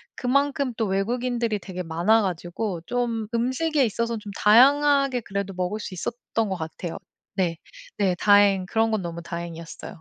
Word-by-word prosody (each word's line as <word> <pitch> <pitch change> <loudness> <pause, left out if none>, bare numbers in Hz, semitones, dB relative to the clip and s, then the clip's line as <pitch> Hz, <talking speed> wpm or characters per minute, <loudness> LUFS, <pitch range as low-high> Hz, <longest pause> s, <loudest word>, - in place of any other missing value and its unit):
그만큼 280 0 0
또 225 - +1
외국인들이 230 +3 -1
되게 185 -2 -6
많아 175 +7 +2
가지고 180 +1 -3
좀 235 -2 -2
음식에 260 +5 +1
있어서 230 +1 -2
좀 210 -1 -8
다양하게 275 +4 +5
그래도 200 -2 -4
먹을 185 +4 -2
수 200 - -6
있었던 225 +3 -3
것 190 - -1
같아요. 165 0 -6 0.4
네. 175 -4 0 0.4
네. 190 -3 +2
다행 205 -1 +4
그런 225 +4 +1
건 215 -2 0
너무 170 -1 -5
다행이었어요. 170 +1 -7
210 Hz, 335 characters per minute, -24 LUFS, 180-240 Hz, 0.4 s, 다양하게